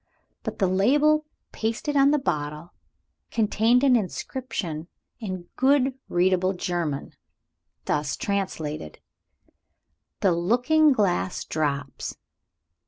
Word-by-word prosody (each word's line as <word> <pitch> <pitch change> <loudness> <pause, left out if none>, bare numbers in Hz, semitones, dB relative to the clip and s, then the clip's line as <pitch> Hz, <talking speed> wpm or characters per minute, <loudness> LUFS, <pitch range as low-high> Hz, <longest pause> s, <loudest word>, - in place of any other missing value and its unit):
But - - -5
the 195 - +2
label 290 +11 +3 0.2
pasted 230 +7 -2
on 275 0 +6
the 300 - +4
bottle 150 - -3 0.6
contained 225 +3 +2
an 265 -3 +6
inscription 190 -6 -3 0.3
in 185 -6 -5
good 270 0 +3 0.2
readable 185 +1 +2
German, 175 -6 -3 0.7
thus 145 -1 -1
translated: 160 - -3 1.2
"The 190 - +4
Looking 245 - +3
Glass 190 -6 0
Drops. 145 -3 -3
195 Hz, 95 wpm, -25 LUFS, 170-260 Hz, 1.2 s, on